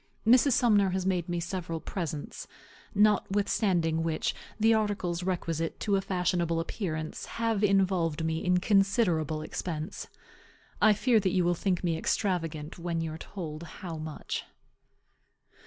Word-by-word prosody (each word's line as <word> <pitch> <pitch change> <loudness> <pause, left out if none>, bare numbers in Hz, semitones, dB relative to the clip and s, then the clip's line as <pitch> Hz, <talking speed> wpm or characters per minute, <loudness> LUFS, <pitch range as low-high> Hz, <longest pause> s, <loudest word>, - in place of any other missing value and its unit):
Mrs. 255 +4 +6
Sumner 210 -5 +4
has 185 0 -1
made 180 -3 0
me 175 0 -1
several 170 -1 -4
presents; 160 -4 -5 0.5
notwithstanding 200 -5 +2
which, 165 -1 -1 0.3
the 225 +1 +5
articles 205 -5 0
requisite 165 -3 -2
to 205 -2 +1
a 195 - +2
fashionable 175 -3 0
appearance 160 -3 -4
have 225 -2 0
involved 185 -5 +2
me 160 0 -1
in 180 0 +3
considerable 180 -6 +2
expense. 155 0 -5 0.7
I 215 - +7
fear 230 +2 +3
that 195 -2 +1
you 180 -2 +2
will 175 - +3
think 180 +1 -1
me 165 -2 0
extravagant 165 -5 -1
when 170 -1 -2
you 160 -1 -3
are 160 - -8
told 160 -6 -6
how 170 0 -7
much. 155 -1 -5
180 Hz, 140 wpm, -29 LUFS, 165-200 Hz, 0.7 s, I